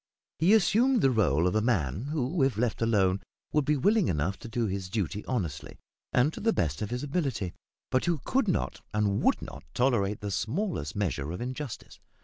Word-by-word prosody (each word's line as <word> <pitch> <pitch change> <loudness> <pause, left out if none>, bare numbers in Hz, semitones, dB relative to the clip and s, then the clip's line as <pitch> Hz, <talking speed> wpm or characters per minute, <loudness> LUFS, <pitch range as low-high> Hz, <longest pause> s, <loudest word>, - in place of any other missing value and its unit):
He 175 +7 +5
assumed 225 +5 +4
the 135 - +5
role 85 - +2
of 90 - +2
a 110 - +2
man 100 - 0
who, 150 +2 -1
if 135 -5 +2
let 120 0 0
alone, 100 -4 +2 0.3
would 150 -2 +2
be 150 +1 +2
willing 205 - +3
enough 85 +4 -1
to 120 - -8
do 115 0 0
his 95 -2 -3
duty 105 0 -2
honestly, 85 - -3 0.3
and 130 +5 +3
to - - -7
the 225 - +2
best 75 - -1
of 105 - -2
his 125 +2 -3
ability, 140 - -2 0.4
but 130 - +2
who 170 -2 +1
could 265 -3 +1
not 180 - -1
and 105 -2 +1
would - - +2
not - - -9
tolerate 115 -6 +1
the 100 -1 -3
smallest 115 - -2
measure 80 -7 -1
of 90 - -5
injustice. 130 +1 -6
115 Hz, 195 wpm, -29 LUFS, 95-150 Hz, 0.4 s, He